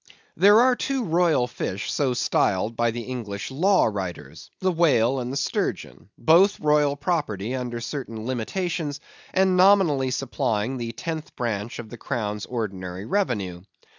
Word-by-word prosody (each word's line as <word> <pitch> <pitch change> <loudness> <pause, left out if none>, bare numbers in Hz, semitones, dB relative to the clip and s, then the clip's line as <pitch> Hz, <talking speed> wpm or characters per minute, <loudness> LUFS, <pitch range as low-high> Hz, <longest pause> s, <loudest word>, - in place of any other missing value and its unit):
There 205 +6 +6
are 255 0 +4
two 270 0 -2
royal 165 -6 +2
fish 100 -4 -4
so 130 -4 +1
styled 110 -2 +1
by 120 +1 +2
the 120 +1 -4
English 115 -4 -5
law 185 +8 +3
writers—the 90 - -4
whale 135 -7 +3
and 125 0 -4
the 135 - -3
sturgeon; 140 -7 -3
both 180 +5 +4
royal 150 -1 +3
property 140 - -2
under 125 -2 -3
certain 115 -3 -5
limitations, 145 - -2 0.3
and 190 0 +3
nominally 180 -8 +4
supplying 125 -2 -1
the 115 -1 -4
tenth 155 +7 -6
branch 115 -2 -3
of 115 -2 -8
the 120 - -8
crown's 105 -6 -3
ordinary 95 -5 -4
revenue. 105 - -1
130 Hz, 140 wpm, -24 LUFS, 110-165 Hz, 0.3 s, There